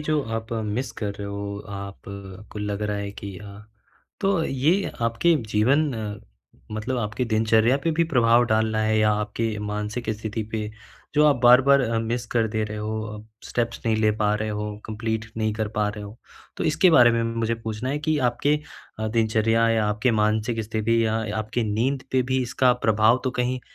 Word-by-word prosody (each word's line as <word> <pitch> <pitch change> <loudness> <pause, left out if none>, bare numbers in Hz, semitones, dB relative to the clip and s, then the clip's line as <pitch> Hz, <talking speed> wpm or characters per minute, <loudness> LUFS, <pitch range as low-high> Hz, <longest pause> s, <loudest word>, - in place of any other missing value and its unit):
जो 150 0 0 0.2
आप 110 +1 -9
मिस 115 +5 -2
कर 105 -2 -2
रहे 100 0 -6
हो 100 0 -5
आप 100 -1 -7 0.5
को - - -6
लग 105 0 -3
रहा 105 -1 -1
है 100 0 -4
कि 100 -2 -8
अ, 100 -1 -11 0.6
तो 195 -4 +2
ये 155 +10 +1
आपके 115 +9 +3 0.2
जीवन 140 +8 +3 0.8
मतलब 110 +4 -2
आपके 110 +2 -2
दिनचर्या 110 +2 +3
पे 165 - +2
भी 165 +2 +2
प्रभाव 120 -1 +5
डाल 110 0 +2
रहा 110 0 0
है 110 0 +2
या 110 0 +4
आपके 105 +1 -2
मानसिक 105 +3 -3
स्थिति 110 +1 -3
पे 110 -1 -2 0.5
जो 150 0 +5
आप 145 -3 +4
बार-बार 130 +3 +7
अ, 115 -3 0
मिस 120 +2 -2
कर 115 -2 +3
दे 110 0 -1
रहे 105 0 -6
हो, 110 +1 -3
अ, 110 +1 -11
स्टेप्स 115 -1 -2
नहीं 110 -1 +2
ले 110 0 +3
पा 105 0 +3
रहे 110 +1 -2
हो, 105 0 -4
कंप्लीट 110 0 -3
नहीं 110 -1 0
कर 110 -1 -2
पा 105 -1 +2
रहे 105 0 -6
हो। 100 +2 -10 0.4
तो - - -3
इसके 175 +4 +4
बारे 120 -7 +7
में 115 0 +1
मुझे 115 0 -1
पूछना 115 +1 -5
है 145 - -1
कि 155 +1 0
आपके 145 +5 +1 0.4
अ, 110 0 -1
दिनचर्या 115 0 +2
या 110 -2 +2
आपके 105 +4 +1
मानसिक 110 +2 +1
स्थिति 115 +2 +1
या 110 0 +1 0.2
आपकी 110 +3 -2
नींद 130 +5 0
पे 130 -1 +3
भी 130 0 +2
इसका 125 +1 +2
प्रभाव 110 +3 +4
तो 130 - +1
कहीं 125 +1 -1
110 Hz, 195 wpm, -24 LUFS, 105-125 Hz, 0.8 s, बार-बार